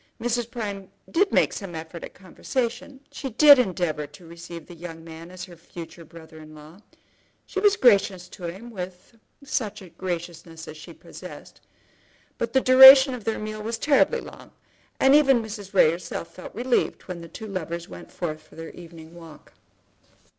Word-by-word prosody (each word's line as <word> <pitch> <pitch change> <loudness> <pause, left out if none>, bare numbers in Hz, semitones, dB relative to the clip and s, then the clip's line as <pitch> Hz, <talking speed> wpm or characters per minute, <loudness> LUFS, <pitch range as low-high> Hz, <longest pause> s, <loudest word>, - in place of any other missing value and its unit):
Mrs. 240 0 -1
Prime 205 -5 -6 0.2
did 390 +4 +2
make - - +3
some 195 -5 -7
effort 160 +1 -8
at - - -10
conversation; 245 +7 -4
she 270 - -6
did 285 +3 +8
endeavour 175 -9 -1
to 150 +4 -16
receive 170 -1 -10
the 175 - -12
young 165 -1 -9
man 165 +1 -11
as 180 0 -9
her 175 -2 -14
future 170 0 -11
brother 160 0 -14
in 155 0 -13
law; 155 +6 -14 0.6
she 385 - -4
was 410 0 +4
gracious 195 -6 +3
to 180 - -9
him 195 +8 -7
with 185 +1 -8 0.3
such 240 -9 -3 0.2
graciousness 170 -2 -6
as 155 - -9
she 155 - -11
possessed; - - -12 0.8
but 230 - -2
the 265 - +3
duration 265 +1 +9
of 240 -5 -8
their 225 - -1
meal 215 0 -6
was 230 +2 -3
terribly 290 -2 +2
long, - - -12 0.5
and 270 +1 +5
even 275 -4 +5
Mrs. 210 -3 -7
Ray 185 -6 +5
herself 170 0 -6
felt 185 - -11
relieved 245 +2 0
when 180 -2 -7
the 170 - -9
two 220 - -9
lovers 170 -4 -5
went - - -12
forth 160 -4 -4
together 155 0 -25
for - - -17
their 165 0 -8
evening 165 -1 -13
walk. 165 -3 -14
185 Hz, 175 wpm, -24 LUFS, 165-235 Hz, 0.8 s, duration